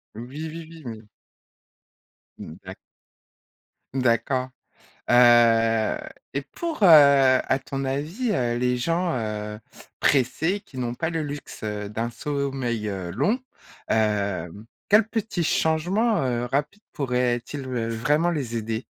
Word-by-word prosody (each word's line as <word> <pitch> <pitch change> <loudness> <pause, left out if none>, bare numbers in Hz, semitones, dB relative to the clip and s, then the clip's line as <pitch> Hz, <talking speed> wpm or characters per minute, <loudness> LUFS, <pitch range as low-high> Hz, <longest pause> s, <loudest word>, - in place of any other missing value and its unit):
Oui, 130 +8 -6
oui, 165 -1 -8
oui, 165 -1 -12
oui. 110 -2 -7 1.3
Mmh 80 - -9
d'a 95 0 -8 1.2
D'accord. 130 0 +1 0.6
Heu, 115 -2 +5 0.4
et 140 - -1
pour, 330 -9 -4
heu, - - +8
à 140 -5 +6
ton 135 0 -5
avis, 160 - -2
heu, 120 -7 0
les 125 0 +1
gens, 170 +6 0
heu, 105 -1 -4 0.4
pressés 150 +9 +2
qui 150 -11 -13
n'ont 120 -1 -2
pas 160 +6 -2
le 165 -1 -2
luxe, 145 -4 -7
heu, 105 -1 -4
d'un 115 +2 -2
sommeil, 135 -4 -3
heu, 95 -3 -4
long, 145 - +1 0.5
heu, 100 -6 0 0.4
quels 210 +1 +5
petits 220 -6 -2
changements, 180 +9 +1
heu, 120 -1 -1
rapides 145 +9 -2
pourraient-ils, 125 +1 -1
heu, 120 -3 -2
vraiment 150 +9 +1
les 135 -8 -3
aider? 115 +1 -3
130 Hz, 125 wpm, -24 LUFS, 115-160 Hz, 1.3 s, heu